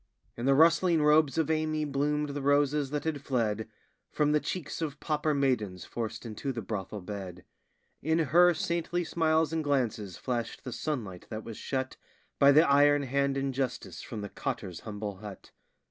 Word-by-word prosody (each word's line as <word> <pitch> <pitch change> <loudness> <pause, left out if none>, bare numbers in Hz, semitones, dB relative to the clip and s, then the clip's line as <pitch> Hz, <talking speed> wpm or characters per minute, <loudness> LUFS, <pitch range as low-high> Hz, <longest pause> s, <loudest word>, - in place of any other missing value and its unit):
In 120 +3 -3
the 135 - +5
rustling 165 +1 +5
robes 150 -2 +4
of 160 -1 +1
Amy 155 -1 0
bloomed 150 +1 0
the 145 0 -4
roses 145 0 +2
that 145 0 -2
had 155 -3 -2
fled 110 -5 -1 0.4
From 150 0 +1
the 150 - +4
cheeks 165 0 -4
of 150 -2 -3
pauper 150 -1 0
maidens 110 -10 0
forced 115 -1 -5
into 115 +5 -4
the 115 -4 -5
brothel 100 0 -5
bed; 90 -2 -7 0.6
In 160 +3 +1
her 170 +3 +5
saintly 170 +2 -1
smiles 160 -1 +1
and 160 -1 0
glances 115 - -1
flashed 120 -3 -3
the 125 - -5
sunlight 110 - -4
that 110 0 -5
was 115 -2 -8
shut 130 -1 -3 0.4
By 140 0 +7
the 155 +4 +6
iron 145 +1 +5
hand 140 +1 0
injustice 135 -2 -3
from 110 -3 -6
the 105 - -5
cotter's 90 -2 -4
humble 105 -2 -6
hut. 105 -1 -10
140 Hz, 170 wpm, -29 LUFS, 115-150 Hz, 0.6 s, By